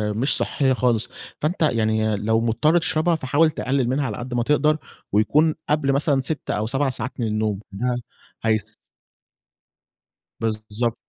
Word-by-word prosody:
مش 130 Hz, +6 st, +2 dB
صحية 135 Hz, -2 st, +1 dB
خالص. 120 Hz, -1 st, +1 dB, 0.3 s
فأنت 160 Hz, +4 st, -2 dB
يعني 110 Hz, -5 st, +2 dB
لو 110 Hz, +2 st, +1 dB
مضطر 120 Hz, +9 st, +2 dB
تشربها 160 Hz, 0 st, +2 dB
فحاول 155 Hz, +3 st, +2 dB
تقلل 130 Hz, -3 st, -1 dB
منها 140 Hz, +2 st, 0 dB
على 105 Hz, -4 st, -3 dB
قد 120 Hz, 0 st, -6 dB
ما 120 Hz, -1 st, +1 dB
تقدر، 150 Hz, +2 st, +2 dB, 0.3 s
ويكون 150 Hz, +10 st, +3 dB
قبل 150 Hz, -2 st, +2 dB
مثلًا 140 Hz, -1 st, +2 dB
6 150 Hz, +3 st, -3 dB
أو 105 Hz, +1 st, -1 dB
7 135 Hz, +2 st, +1 dB
ساعات 125 Hz, +1 st, -3 dB
من 115 Hz, -, 0 dB
النوم 105 Hz, -2 st, -1 dB
ده 125 Hz, +5 st, -1 dB, 0.5 s
هيس 110 Hz, -1 st, +1 dB, 1.6 s
بالضبط 110 Hz, +1 st, -1 dB
125 Hz, 145 wpm, -23 LUFS, 110-145 Hz, 1.6 s, ويكون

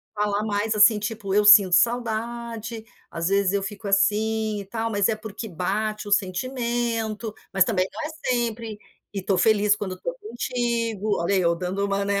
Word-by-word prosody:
Falar 210 Hz, 0 st, 0 dB
mais, 215 Hz, +1 st, -1 dB
assim, 210 Hz, +1 st, +6 dB
tipo: 210 Hz, -2 st, -4 dB
"Eu 210 Hz, +1 st, +4 dB
sinto 205 Hz, -3 st, +8 dB
saudade. 230 Hz, 0 st, -1 dB, 0.3 s
Às 165 Hz, 0 st, -2 dB
vezes 195 Hz, -1 st, +2 dB
eu 200 Hz, -1 st, 0 dB
fico 205 Hz, +2 st, -7 dB
assim 215 Hz, +2 st, +1 dB
e 200 Hz, -, -7 dB
tal, 225 Hz, +3 st, -3 dB
mas, 205 Hz, -2 st, +1 dB
é 225 Hz, -, +1 dB
porque 215 Hz, +1 st, -7 dB
bate 210 Hz, +4 st, -2 dB
o -, -, -4 dB
sentimento. 230 Hz, +1 st, -1 dB, 0.2 s
Mas, 195 Hz, -2 st, +4 dB
também 190 Hz, -5 st, 0 dB
não -, -, -7 dB
é -, -, -5 dB, 0.2 s
sempre. 230 Hz, -3 st, -2 dB, 0.3 s
E 195 Hz, -2 st, -4 dB
tô 190 Hz, -1 st, 0 dB
feliz 210 Hz, 0 st, +3 dB
quando 190 Hz, -3 st, -5 dB
tô -, -, -4 dB
contigo.". 235 Hz, -, -2 dB
Olha, 185 Hz, +4 st, +1 dB
eu 170 Hz, -3 st, +2 dB
dando 185 Hz, +3 st, -3 dB
uma, 200 Hz, 0 st, -1 dB
né, 200 Hz, 0 st, 0 dB
210 Hz, 175 wpm, -24 LUFS, 200-225 Hz, 0.3 s, sinto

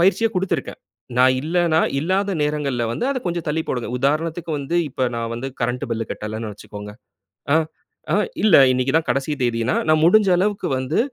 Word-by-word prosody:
பயிற்சிய 200 Hz, +6 st, +3 dB
கொடுத்துருக்கேன். 180 Hz, -6 st, -2 dB, 0.4 s
நா 125 Hz, -, +6 dB, 0.2 s
இல்லன்னா, 165 Hz, 0 st, +2 dB, 0.2 s
இல்லாத 190 Hz, +5 st, 0 dB
நேரங்கள்ல 150 Hz, -4 st, -1 dB
வந்து 240 Hz, -, -3 dB
அத 265 Hz, -, -1 dB
கொஞ்சம் 170 Hz, -2 st, -2 dB
தள்ளி 160 Hz, +2 st, 0 dB
போடுங்க. 125 Hz, -2 st, -2 dB
உதாரணத்துக்கு 160 Hz, +5 st, -1 dB
வந்து, 140 Hz, +5 st, -2 dB
இப்ப 130 Hz, -1 st, -1 dB
நா 115 Hz, -, -2 dB
வந்து 120 Hz, +3 st, -5 dB
கரண்ட்டு 125 Hz, +3 st, -1 dB
பில் 115 Hz, -1 st, -2 dB
கட்டலன்னு 110 Hz, 0 st, -5 dB
வச்சுக்கோங்க. 105 Hz, 0 st, -9 dB, 0.6 s
ஆ -, -, +6 dB, 0.6 s
ஆ -, -, +4 dB, 0.3 s
இல்ல 215 Hz, -5 st, +6 dB, 0.2 s
இன்னக்கி 130 Hz, +1 st, 0 dB
தான் 160 Hz, 0 st, +2 dB
கடைசி 140 Hz, +4 st, 0 dB
தேதின்னா, 120 Hz, 0 st, 0 dB
நா 155 Hz, -, +5 dB
முடிஞ்ச 210 Hz, +3 st, +5 dB
அளவுக்கு 205 Hz, +2 st, 0 dB
வந்து 130 Hz, +8 st, -1 dB
150 Hz, 165 wpm, -21 LUFS, 125-175 Hz, 0.6 s, நா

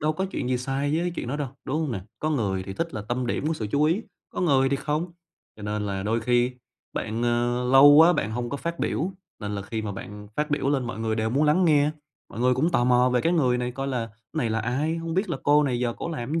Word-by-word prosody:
đâu 155 Hz, 0 st, +1 dB
có 190 Hz, +5 st, -2 dB
chuyện 125 Hz, -, -3 dB
gì 125 Hz, -, +1 dB
sai 135 Hz, +4 st, -1 dB
với 175 Hz, 0 st, -1 dB
chuyện -, -, -4 dB
đó 140 Hz, -, -2 dB
đâu, 145 Hz, -3 st, -3 dB, 0.2 s
đúng 150 Hz, +4 st, -1 dB
hông 150 Hz, -6 st, -1 dB
nè? 95 Hz, -, -3 dB, 0.2 s
Có 155 Hz, -, -1 dB
người 100 Hz, -9 st, 0 dB
thì 95 Hz, -, -6 dB
thích 165 Hz, +9 st, -3 dB
là 105 Hz, -, -4 dB
tâm 125 Hz, +1 st, -1 dB
điểm 130 Hz, -, -1 dB
của 165 Hz, -, 0 dB
sự 110 Hz, -7 st, -4 dB
chú 145 Hz, +1 st, +3 dB
ý, 170 Hz, +8 st, +2 dB, 0.3 s
có -, -, -4 dB
người 135 Hz, -6 st, +3 dB
thì 140 Hz, -, +1 dB
không, 155 Hz, +5 st, -2 dB, 0.4 s
cho 105 Hz, -, -11 dB
nên 105 Hz, 0 st, -2 dB
là 95 Hz, -1 st, -3 dB
đôi 110 Hz, +3 st, 0 dB
khi 120 Hz, +2 st, +2 dB, 0.4 s
bạn, 110 Hz, +2 st, -3 dB
ờ, 120 Hz, +1 st, +1 dB
lâu 135 Hz, +2 st, +9 dB
quá 165 Hz, +4 st, +8 dB
bạn 110 Hz, -9 st, -1 dB
hông 120 Hz, +1 st, -3 dB
có 140 Hz, -, -2 dB
phát 170 Hz, +3 st, -4 dB
biểu, 185 Hz, +5 st, -1 dB, 0.3 s
nên 105 Hz, -1 st, -4 dB
là 100 Hz, -, -3 dB
khi 110 Hz, +2 st, -4 dB
mà 105 Hz, -2 st, -3 dB
bạn 105 Hz, +1 st, -9 dB
phát 150 Hz, +1 st, -1 dB
biểu 145 Hz, -2 st, 0 dB
lên 135 Hz, -3 st, +1 dB
mọi 115 Hz, -, -5 dB
người 110 Hz, 0 st, -1 dB
đều 110 Hz, 0 st, 0 dB
muốn 140 Hz, +5 st, +2 dB
lắng 155 Hz, +5 st, +4 dB
nghe, 150 Hz, -2 st, +4 dB, 0.4 s
mọi 115 Hz, -, -7 dB
người 125 Hz, +1 st, +4 dB
cũng 155 Hz, +7 st, +1 dB
tò 120 Hz, -, +2 dB
mò 125 Hz, 0 st, +4 dB
về 125 Hz, -, +2 dB
cái 165 Hz, -, +1 dB
người 130 Hz, -8 st, +2 dB
này 125 Hz, 0 st, -2 dB
coi 135 Hz, +1 st, -3 dB
là 120 Hz, -4 st, -2 dB, 0.2 s
"Này 135 Hz, -8 st, -1 dB
là 110 Hz, 0 st, 0 dB
ai? 140 Hz, +8 st, -1 dB
Hông 165 Hz, 0 st, -4 dB
biết 190 Hz, +3 st, 0 dB
là -, -, -1 dB
cô 150 Hz, +1 st, +5 dB
này 130 Hz, -4 st, 0 dB
giờ 120 Hz, -1 st, 0 dB
cổ -, -, -5 dB
làm 130 Hz, -3 st, -4 dB
cái 165 Hz, -, +1 dB
130 Hz, 285 wpm, -25 LUFS, 115-150 Hz, 0.4 s, lâu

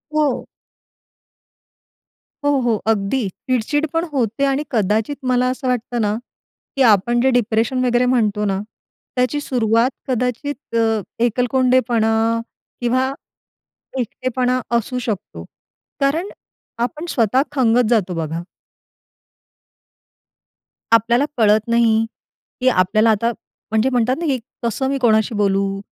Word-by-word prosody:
हो. 300 Hz, -4 st, +1 dB, 2.0 s
हो, 290 Hz, -, +4 dB
हो. 235 Hz, -2 st, +2 dB
अगदी 215 Hz, +2 st, +1 dB
चिड-चिड 255 Hz, +9 st, -1 dB
पण 330 Hz, 0 st, +1 dB
होते 240 Hz, -1 st, 0 dB
आणि 275 Hz, +1 st, 0 dB
कदाचित 220 Hz, +4 st, +1 dB, 0.2 s
मला 250 Hz, 0 st, +2 dB
असं 260 Hz, +1 st, -3 dB
वाटतं 245 Hz, -1 st, -1 dB
ना, 210 Hz, -1 st, +1 dB, 0.6 s
की 275 Hz, -, 0 dB
आपण 235 Hz, +4 st, +2 dB
जे 265 Hz, -, +3 dB
डिप्रेशन 240 Hz, +1 st, +1 dB
वगैरे 245 Hz, 0 st, +2 dB
म्हणतो 215 Hz, -5 st, +1 dB
ना, 195 Hz, -1 st, 0 dB, 0.6 s
त्याची 255 Hz, +3 st, +1 dB
सुरुवात 235 Hz, -2 st, +1 dB, 0.2 s
कदाचित 250 Hz, +2 st, -3 dB
अ, 225 Hz, -1 st, +2 dB, 0.2 s
एकलकोंडेपणा 245 Hz, -1 st, +2 dB, 0.7 s
किंवा 255 Hz, +2 st, +1 dB, 0.9 s
एकटेपणा 255 Hz, +1 st, -1 dB, 0.2 s
असू 250 Hz, +2 st, -3 dB
शकतो 185 Hz, -, -4 dB, 0.6 s
कारण 315 Hz, +8 st, +1 dB, 0.5 s
आपण 300 Hz, +6 st, -3 dB
स्वतः 240 Hz, 0 st, +2 dB
खंगत 245 Hz, -4 st, +3 dB
जातो 205 Hz, -6 st, +1 dB
बघा. 165 Hz, 0 st, -3 dB, 2.5 s
आपल्याला 235 Hz, +4 st, +4 dB
कळत 215 Hz, -1 st, +3 dB
नाही, 230 Hz, -1 st, +3 dB, 0.6 s
की 255 Hz, -, +1 dB
आपल्याला 215 Hz, +1 st, +3 dB
आता 230 Hz, +3 st, +1 dB, 0.4 s
म्हणजे 220 Hz, +4 st, +2 dB
म्हणतात 250 Hz, 0 st, +1 dB
ना 340 Hz, -, -3 dB
की 275 Hz, -4 st, +1 dB, 0.3 s
कसं 235 Hz, +3 st, -1 dB
मी 275 Hz, -, 0 dB
कोणाशी 220 Hz, -2 st, +2 dB
बोलू? 195 Hz, -1 st, +1 dB
240 Hz, 115 wpm, -20 LUFS, 220-255 Hz, 2.5 s, हो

